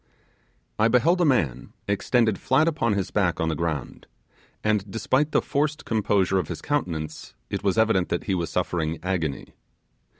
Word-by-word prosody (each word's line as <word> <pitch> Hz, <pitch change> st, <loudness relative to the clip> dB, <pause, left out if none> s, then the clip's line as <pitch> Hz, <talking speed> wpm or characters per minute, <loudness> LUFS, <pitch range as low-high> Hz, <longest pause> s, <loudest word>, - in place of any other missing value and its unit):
I 110 Hz, -, +5 dB
beheld 155 Hz, +10 st, +3 dB
a -, -, +4 dB
man 95 Hz, -, 0 dB
extended 110 Hz, +1 st, +1 dB
flat 155 Hz, +5 st, +2 dB
upon 130 Hz, -9 st, +1 dB
his 100 Hz, -2 st, -2 dB
back 95 Hz, -5 st, +1 dB
on 80 Hz, -, +1 dB
the 80 Hz, -, -1 dB
ground, 75 Hz, -4 st, -4 dB, 0.6 s
and, 105 Hz, -2 st, +1 dB
despite 130 Hz, +8 st, 0 dB
the -, -, +2 dB
forced 150 Hz, +1 st, -1 dB
composure 100 Hz, -4 st, +1 dB
of 85 Hz, -, -3 dB
his -, -, -5 dB
countenance, 80 Hz, -, -3 dB, 0.2 s
it -, -, -3 dB
was 100 Hz, 0 st, +1 dB
evident 110 Hz, -5 st, +3 dB
that 85 Hz, -, -1 dB
he 100 Hz, -, -1 dB
was 85 Hz, -3 st, -1 dB
suffering 85 Hz, -3 st, -1 dB
agony. 85 Hz, -6 st, -2 dB
100 Hz, 165 wpm, -25 LUFS, 85-120 Hz, 0.6 s, I